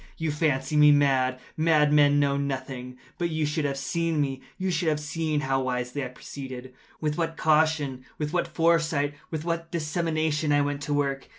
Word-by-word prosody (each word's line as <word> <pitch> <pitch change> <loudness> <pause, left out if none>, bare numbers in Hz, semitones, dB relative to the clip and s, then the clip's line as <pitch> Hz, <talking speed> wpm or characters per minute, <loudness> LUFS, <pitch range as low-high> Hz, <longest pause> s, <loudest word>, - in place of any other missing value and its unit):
You 160 -1 -1
fancy 150 -2 0
me 150 0 +8
mad. 130 -3 +3 0.2
Madmen 150 -2 +4
know 140 -1 +2
nothing. 130 -2 -4 0.2
But 170 -1 0
you 155 -1 0
should 150 +1 -1
have 140 -1 -1
seen 165 +3 -1
me. 135 -2 -1 0.2
You 185 0 -1
should 170 0 0
have 150 -1 0
seen 155 0 -2
how 135 -1 0
wisely 125 +2 -2
I - - -3
proceeded—with 130 +4 -7
what 165 -1 -1
caution—with 150 -2 0
what 175 - +1
foresight—with 160 -2 0
what 165 0 -3
dissimulation 155 -2 0
I 145 0 +4
went 145 0 -2
to 145 +1 -2
work! 140 -1 -1
150 Hz, 165 wpm, -26 LUFS, 135-160 Hz, 0.2 s, me